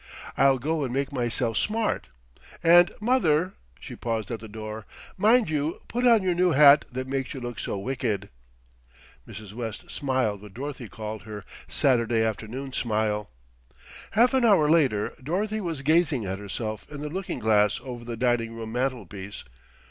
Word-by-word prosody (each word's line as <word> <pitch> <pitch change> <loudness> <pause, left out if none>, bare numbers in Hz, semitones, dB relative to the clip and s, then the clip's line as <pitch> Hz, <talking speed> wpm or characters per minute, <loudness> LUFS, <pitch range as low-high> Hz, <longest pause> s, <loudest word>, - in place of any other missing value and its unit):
"I'll 135 0 +4
go 155 +4 -1
and 130 - -2
make 135 +2 -1
myself 120 -3 -1
smart; 220 0 0 0.6
and 175 +1 +7
mother" 190 -8 +2 0.3
she - - -9
paused 115 -2 -3
at 115 - -3
the 110 - -9
door 110 0 -7 0.3
"mind 220 +3 +4
you 155 +1 -1
put 245 +1 +1
on 230 -4 +5
your 185 -1 +2
new 180 0 +3
hat 145 +1 +7
that 130 +1 -4
makes 135 0 -3
you - - -5
look 120 -4 -6
so - - -3
wicked." 110 -3 -2 1.0
Mrs. 105 -2 -9
West 115 -2 -6
smiled 130 -8 -1
what 105 -2 -13
Dorothy 135 -3 -6
called 110 -1 -6
her 105 -2 -8 0.2
"Saturday 115 -4 +2
afternoon 110 +5 -4
smile." 105 -3 -1 0.8
Half 240 +5 +4
an 260 -2 +3
hour 195 -10 +5
later 135 -10 +2
Dorothy 205 +9 -1
was 165 -7 -4
gazing 155 -5 +2
at 95 0 -3
herself 110 +1 -5
in 145 -1 -7
the 150 - -4
looking 190 +4 -4
glass 105 -2 +3
over 125 -2 -7
the 120 -1 -6
dining 115 -1 0
room 110 -1 -6
mantelpiece. 110 -6 -4
130 Hz, 165 wpm, -26 LUFS, 110-155 Hz, 1.0 s, and